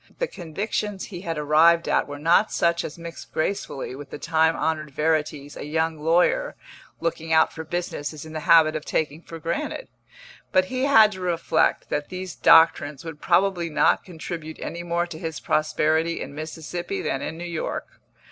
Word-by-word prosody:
The - - 0
convictions 200 - -4
he 180 -4 -8
had 165 -4 -4
arrived 155 +3 +4
at - - +2
were 145 0 -6
not 170 +8 +3
such 170 0 +1
as 150 - -7
mix 170 -1 -8
gracefully 155 -7 -3
with 140 +1 -9
the - - -7
time 160 +1 +2
honoured 155 -2 -1
verities 150 -1 -1
a - - -7
young 160 +1 -1
lawyer 175 - +2 0.4
looking 165 -1 -3
out 160 0 +4
for 160 - -6
business 160 -3 -3
is 155 0 -9
in 160 - -10
the 155 - -3
habit 160 -2 +6
of 155 - -3
taking 155 0 -2
for 165 - -9
granted; 165 - -4 0.6
but 185 -1 +4
he 255 +6 -1
had 220 -6 +6
to 190 -2 -8
reflect 175 -2 +1
that 145 0 -2
these 185 -1 -6
doctrines 160 -3 +4
would 160 -2 -8
probably 175 -1 +2
not 150 - +3
contribute 165 -2 -7
any 170 - -5
more 175 0 -1
to 170 -2 -9
his 160 -2 -4
prosperity 155 +2 +1
in - - -6
Mississippi 155 - -5
than 135 - -1
in 160 - -5
New 170 - -6
York. 170 -2 -4
165 Hz, 180 wpm, -24 LUFS, 155-175 Hz, 0.6 s, habit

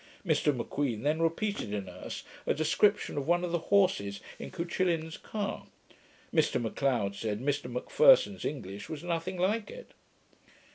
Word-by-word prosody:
Mr 155 -3 +3
M'Queen 125 -2 -2
then 155 +3 +1
repeated 165 - -1
in 100 -2 -3
Erse 90 0 -7 0.2
a - - +2
description 180 +2 +2
of 140 - -5
one 175 +1 +3
of 175 - -2
the 170 -1 -2
horses 100 - +3 0.2
in - - -6
Cuchillin's 170 -2 -1
car. 205 -2 -4 0.7
Mr - - +3
M'Leod 120 -3 0
said, 105 +1 -3
Mr 140 0 -1
M'Pherson's 460 - +4
English 100 -8 -5
was 155 -1 -6
nothing 175 +2 -2
like 205 +5 0
it. - - -11
160 Hz, 145 wpm, -30 LUFS, 120-185 Hz, 0.7 s, M'Pherson's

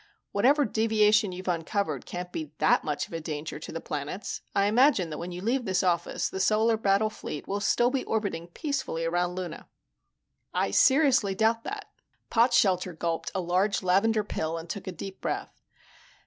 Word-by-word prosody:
Whatever 275 +8 +4
deviation 215 -1 +3
you've 185 +1 -8
uncovered 165 - -1
can't 180 0 -5
be 155 -3 -5
that - - +3
much 150 -2 -2
of - - -15
a 165 - -2
danger 155 -1 -5
to - - -8
the 165 - -4
planets. 150 +6 -5
I 200 - +3
imagine 215 - +3
that 150 - -5
when 175 +1 -5
you 180 +1 -7
leave 245 +4 +1
this 190 -2 +1
office, 175 -2 0
the 190 - -5
Solar 220 +4 +3
Battle 215 0 +2
Fleet 150 -8 -7
will 200 +1 -1
still 240 +4 +2
be 270 -1 -1
orbiting 200 -7 -2
peacefully 175 - -3
around 175 +1 0
Luna." 180 -3 -6 0.9
"I - - +1
seriously 260 -8 +4
doubt 225 +2 +2
that." 415 0 -6 0.4
Potshelter 190 -7 +3
gulped 165 0 -2
a 190 - 0
large 185 +4 +1
lavender 210 +4 +3
pill 165 -5 -3
and 165 +1 -7
took 200 +2 -6
a - - -2
deep 190 +3 -8
breath. - - -4
195 Hz, 175 wpm, -28 LUFS, 170-220 Hz, 0.9 s, Whatever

